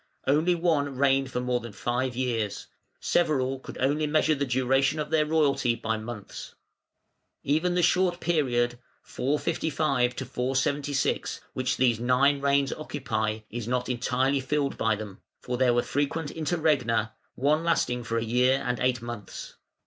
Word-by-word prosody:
Only 155 Hz, +6 st, +3 dB
one 155 Hz, -5 st, 0 dB
reigned 135 Hz, 0 st, +2 dB
for 125 Hz, -, -2 dB
more 125 Hz, 0 st, 0 dB
than 120 Hz, -2 st, -9 dB
five 125 Hz, +3 st, -2 dB
years; 115 Hz, -5 st, -2 dB, 0.3 s
several 135 Hz, -6 st, +1 dB
could -, -, -10 dB
only 145 Hz, +4 st, +1 dB
measure 155 Hz, +1 st, +3 dB
the 140 Hz, -1 st, -1 dB
duration 135 Hz, +3 st, +2 dB
of 150 Hz, 0 st, -3 dB
their 155 Hz, -1 st, +3 dB
royalty 145 Hz, -6 st, +2 dB
by 110 Hz, -1 st, -2 dB
months. 110 Hz, -2 st, -8 dB, 0.9 s
Even 165 Hz, +5 st, +1 dB
the 180 Hz, -, +2 dB
short 180 Hz, 0 st, +2 dB
period 120 Hz, -8 st, 0 dB, 0.2 s
(455 140 Hz, -3 st, 0 dB
476) 135 Hz, +2 st, -1 dB
which 130 Hz, 0 st, -1 dB
these 120 Hz, -3 st, +2 dB
nine 135 Hz, +4 st, +3 dB
reigns 140 Hz, 0 st, +2 dB
occupy 110 Hz, -8 st, -3 dB
is 115 Hz, -1 st, -5 dB
not 125 Hz, 0 st, -1 dB
entirely 130 Hz, +2 st, +1 dB
filled 140 Hz, +1 st, -1 dB
by 110 Hz, -1 st, +1 dB
them, 105 Hz, -2 st, -9 dB, 0.2 s
for 125 Hz, -, -4 dB
there 130 Hz, -2 st, +4 dB
were 120 Hz, -, +2 dB
frequent 145 Hz, +2 st, -2 dB
interregna, 150 Hz, -, 0 dB, 0.2 s
one 150 Hz, +5 st, +2 dB
lasting 125 Hz, -7 st, +1 dB
for 115 Hz, 0 st, -2 dB
a 115 Hz, -, 0 dB
year 125 Hz, +3 st, +2 dB
and 125 Hz, -2 st, -1 dB
eight 125 Hz, -2 st, 0 dB
months. 120 Hz, -3 st, -7 dB
130 Hz, 150 wpm, -27 LUFS, 120-150 Hz, 0.9 s, there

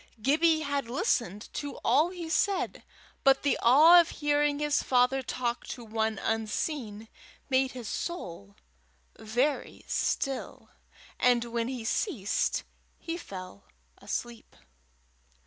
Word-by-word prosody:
Gibbie 315 Hz, +6 st, +3 dB
had 285 Hz, -5 st, -2 dB
listened 230 Hz, -5 st, -1 dB
to 285 Hz, -1 st, -5 dB
all 315 Hz, +4 st, +4 dB
he 355 Hz, -2 st, -7 dB
said, 390 Hz, +4 st, 0 dB, 0.4 s
but 270 Hz, -1 st, +4 dB
the 285 Hz, -, +2 dB
awe 310 Hz, +9 st, +8 dB
of 335 Hz, -, -4 dB
hearing 295 Hz, -1 st, +1 dB
his 295 Hz, 0 st, +1 dB
father 255 Hz, +1 st, +2 dB
talk 245 Hz, -2 st, -3 dB
to 240 Hz, -, -7 dB
one 220 Hz, 0 st, -1 dB
unseen, 225 Hz, +1 st, -3 dB, 0.4 s
made 260 Hz, 0 st, +2 dB
his 245 Hz, -4 st, -7 dB
soul 170 Hz, -, -5 dB, 0.6 s
very 245 Hz, +7 st, -1 dB
still, 275 Hz, -2 st, -2 dB, 0.5 s
and 245 Hz, -1 st, +3 dB
when 235 Hz, 0 st, -2 dB
he 250 Hz, -3 st, -5 dB
ceased 225 Hz, -, 0 dB, 0.3 s
he 330 Hz, -, -5 dB
fell 190 Hz, -, -9 dB, 0.3 s
asleep. 240 Hz, -1 st, -6 dB
255 Hz, 115 wpm, -29 LUFS, 225-295 Hz, 0.6 s, awe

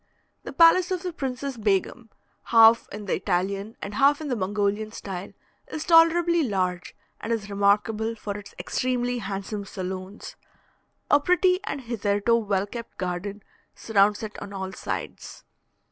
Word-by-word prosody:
The -, -, -8 dB
palace 340 Hz, +2 st, +5 dB
of 370 Hz, -1 st, -2 dB
the 360 Hz, -2 st, -4 dB
Princess 270 Hz, -3 st, -4 dB
Begum, 215 Hz, +2 st, -1 dB, 0.4 s
half 230 Hz, 0 st, +6 dB
in 210 Hz, 0 st, -7 dB
the 190 Hz, -, -1 dB
Italian 195 Hz, +3 st, -2 dB
and 200 Hz, -, -5 dB
half 280 Hz, +6 st, +4 dB
in 310 Hz, -2 st, -5 dB
the 250 Hz, -, 0 dB
Mongolian 205 Hz, +1 st, -1 dB
style, 195 Hz, -3 st, -7 dB, 0.4 s
is 310 Hz, -, -5 dB
tolerably 340 Hz, 0 st, +5 dB
large, 185 Hz, -, -2 dB, 0.2 s
and 225 Hz, -, -5 dB
is 210 Hz, -3 st, -2 dB
remarkable 210 Hz, +3 st, +1 dB
for 210 Hz, -2 st, -5 dB
its 205 Hz, -1 st, -10 dB
extremely 245 Hz, -1 st, -1 dB
handsome 200 Hz, 0 st, -5 dB
saloons. 190 Hz, +1 st, -7 dB, 0.8 s
A 290 Hz, -, +7 dB
pretty 365 Hz, +3 st, +3 dB
and 280 Hz, -, -4 dB
hitherto 220 Hz, -2 st, 0 dB
well 200 Hz, -4 st, 0 dB
kept 230 Hz, +3 st, -9 dB
garden 190 Hz, +3 st, -4 dB, 0.3 s
surrounds 205 Hz, -1 st, +2 dB
it 215 Hz, -1 st, -7 dB
on 200 Hz, -, -8 dB
all 190 Hz, -1 st, -5 dB
sides. -, -, -6 dB
215 Hz, 145 wpm, -25 LUFS, 200-255 Hz, 0.8 s, A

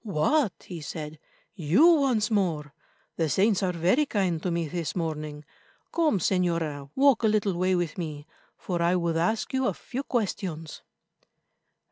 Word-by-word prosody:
"What," 215 Hz, -, 0 dB
he 175 Hz, -3 st, -8 dB
said, 150 Hz, 0 st, -7 dB, 0.3 s
"you 175 Hz, -, +3 dB
once 270 Hz, -10 st, +4 dB
more! 165 Hz, -8 st, 0 dB, 0.4 s
The 160 Hz, -2 st, +1 dB
saints 200 Hz, +4 st, +2 dB
are 185 Hz, -2 st, +1 dB
very 180 Hz, -, +2 dB
kind 185 Hz, -8 st, 0 dB
to 180 Hz, -, -2 dB
me 170 Hz, -1 st, -1 dB
this 165 Hz, -1 st, -4 dB
morning. 155 Hz, -3 st, -4 dB, 0.5 s
Come, 320 Hz, -10 st, +2 dB
Señora, 165 Hz, -6 st, -1 dB
walk 275 Hz, -3 st, +4 dB
a 225 Hz, -, +3 dB
little 210 Hz, -2 st, +1 dB
way 185 Hz, +2 st, +1 dB
with 175 Hz, -1 st, -2 dB
me, 150 Hz, -3 st, -5 dB, 0.3 s
for 175 Hz, -2 st, -3 dB
I 170 Hz, +2 st, +3 dB
would 170 Hz, -2 st, 0 dB
ask 215 Hz, +10 st, 0 dB
you 260 Hz, -1 st, +1 dB
a -, -, -1 dB
few 260 Hz, +1 st, -5 dB
questions." 185 Hz, -, -3 dB
180 Hz, 155 wpm, -27 LUFS, 160-215 Hz, 0.5 s, once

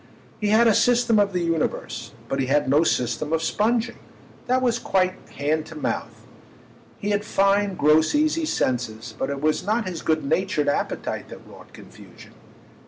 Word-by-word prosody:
He 210 Hz, -, -1 dB
had 220 Hz, +3 st, +5 dB
a 225 Hz, -, +5 dB
system 240 Hz, -1 st, +3 dB
of 200 Hz, -1 st, +2 dB
the 180 Hz, -2 st, -1 dB
universe, 165 Hz, -2 st, -2 dB
but 135 Hz, -, -2 dB
he 130 Hz, -, 0 dB
had 145 Hz, +1 st, +2 dB
no 145 Hz, +4 st, +4 dB
system 150 Hz, +1 st, -1 dB
of 165 Hz, 0 st, 0 dB
sponging—that 240 Hz, +4 st, -2 dB
was 240 Hz, -2 st, +1 dB
quite 185 Hz, -4 st, +1 dB, 0.2 s
hand 155 Hz, +2 st, -1 dB
to 160 Hz, -, -11 dB
mouth. 150 Hz, -, -4 dB, 0.7 s
He 205 Hz, -, -3 dB
had 205 Hz, 0 st, 0 dB
fine 200 Hz, -1 st, +2 dB
gross 155 Hz, -, +3 dB
easy 310 Hz, +2 st, +1 dB
senses, 120 Hz, -, -2 dB
but 135 Hz, -, -3 dB
it 140 Hz, -1 st, -4 dB
was 155 Hz, 0 st, +1 dB
not 215 Hz, +2 st, 0 dB
his 175 Hz, -3 st, -5 dB
good 155 Hz, -2 st, 0 dB
natured 165 Hz, 0 st, 0 dB
appetite -, -, -3 dB
that -, -, -12 dB
wrought -, -, -15 dB
confusion. -, -, -15 dB
180 Hz, 170 wpm, -23 LUFS, 150-215 Hz, 0.7 s, had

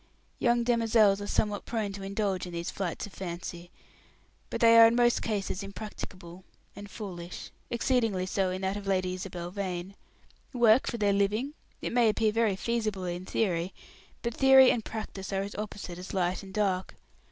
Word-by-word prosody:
Young 240 Hz, -1 st, +3 dB
demoiselles 225 Hz, -4 st, +3 dB
are 205 Hz, -, -5 dB
somewhat 210 Hz, -1 st, -1 dB
prone 220 Hz, -4 st, -2 dB
to 195 Hz, -, -7 dB
indulge 195 Hz, -2 st, -2 dB
in 175 Hz, -, -9 dB
these 170 Hz, 0 st, -3 dB
flights 185 Hz, -4 st, -3 dB
of 205 Hz, -, -13 dB
fancy; 175 Hz, -1 st, -6 dB, 0.8 s
but -, -, -3 dB
they 230 Hz, 0 st, +7 dB
are 225 Hz, -, +10 dB
in 230 Hz, -, +1 dB
most 240 Hz, 0 st, +3 dB
cases 205 Hz, -3 st, -2 dB
impracticable 190 Hz, -3 st, -8 dB, 0.3 s
and 205 Hz, 0 st, -9 dB
foolish 180 Hz, -5 st, -7 dB, 0.2 s
exceedingly 230 Hz, -6 st, +1 dB
so 190 Hz, 0 st, 0 dB
in 185 Hz, +1 st, -4 dB
that 190 Hz, +1 st, 0 dB
of 205 Hz, -1 st, -6 dB
Lady 185 Hz, -1 st, +1 dB
Isabel 180 Hz, -2 st, -6 dB
Vane. 185 Hz, -1 st, -4 dB, 0.6 s
Work 240 Hz, 0 st, +5 dB
for 235 Hz, -, -2 dB
their 205 Hz, -2 st, +2 dB
living? 210 Hz, +8 st, 0 dB, 0.3 s
It -, -, -2 dB
may 235 Hz, -2 st, +4 dB
appear 215 Hz, 0 st, +2 dB
very 220 Hz, -2 st, +2 dB
feasible 215 Hz, -2 st, -2 dB
in 175 Hz, +1 st, -4 dB
theory; 180 Hz, -3 st, -1 dB, 0.5 s
but 235 Hz, -1 st, -1 dB
theory 265 Hz, 0 st, +7 dB
and 230 Hz, -, -1 dB
practice 210 Hz, -3 st, -6 dB
are 195 Hz, 0 st, 0 dB
as 200 Hz, -, -6 dB
opposite 205 Hz, -4 st, -6 dB
as 185 Hz, +2 st, -7 dB
light 180 Hz, 0 st, 0 dB
and 195 Hz, -1 st, -11 dB
dark. 190 Hz, -3 st, -1 dB
200 Hz, 175 wpm, -29 LUFS, 185-225 Hz, 0.8 s, are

